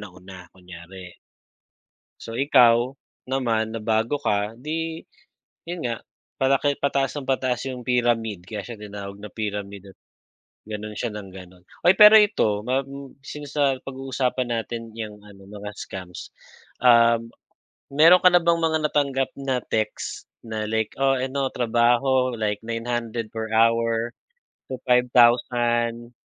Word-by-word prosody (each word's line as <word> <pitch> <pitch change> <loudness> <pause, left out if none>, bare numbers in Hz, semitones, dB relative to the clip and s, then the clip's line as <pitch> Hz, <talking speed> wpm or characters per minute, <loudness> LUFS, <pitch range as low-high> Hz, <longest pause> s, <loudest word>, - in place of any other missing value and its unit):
nauna, 95 -2 -12
kunyari. 90 0 -12 1.1
So, 115 - -7
ikaw 125 -2 +4 0.3
naman 115 -4 -1
na 115 - -4
bago 110 +6 0
ka 105 +2 -1
'di 160 +4 -4 0.6
'yon 175 -1 -5
nga, 115 -2 -2 0.4
palaki 135 +1 +2
pataasa 140 0 0
ng 130 - -12
pataas 130 -1 0
'yung 125 -2 -6
pyramid 115 -6 0
kaya 105 0 -5
siya 115 -3 -9
tinawag 100 -1 -8
na 105 - -8
pyramid 100 -2 -6
at - - -49 0.7
gano'n 105 0 -6
siya 115 -3 -3
nang 100 -2 -8
gano'n. 90 -1 -13 0.2
Oy, 180 - +7
pero 210 +1 +10
ito 155 - +2
ma 130 +2 +1
m 140 0 -10
since 145 +1 -9
napag-uusapan 135 -2 -1
natin 115 0 -4
'yang 105 -2 -7
ano 100 -2 -15
mga 105 0 -8
scams, 90 -2 -8 0.5
ah, 115 -1 +6 0.7
mayro'n 165 +6 +6
ka 180 - +7
na 175 - +6
bang 170 0 +2
mga 160 -1 +2
natanggap 140 -3 0
na 135 -2 0
text 110 -1 -3 0.2
na 110 -1 -3
like, 110 -1 -1
"Oh, 135 -1 +2
ano 135 +1 -2
trabaho, 120 +2 +2
like 105 -1 -2
900 115 0 -3
per 110 0 -4
hour 115 +1 +2 0.5
to 130 - -4
5,000. 120 -1 +3
120 Hz, 135 wpm, -23 LUFS, 105-135 Hz, 1.1 s, pero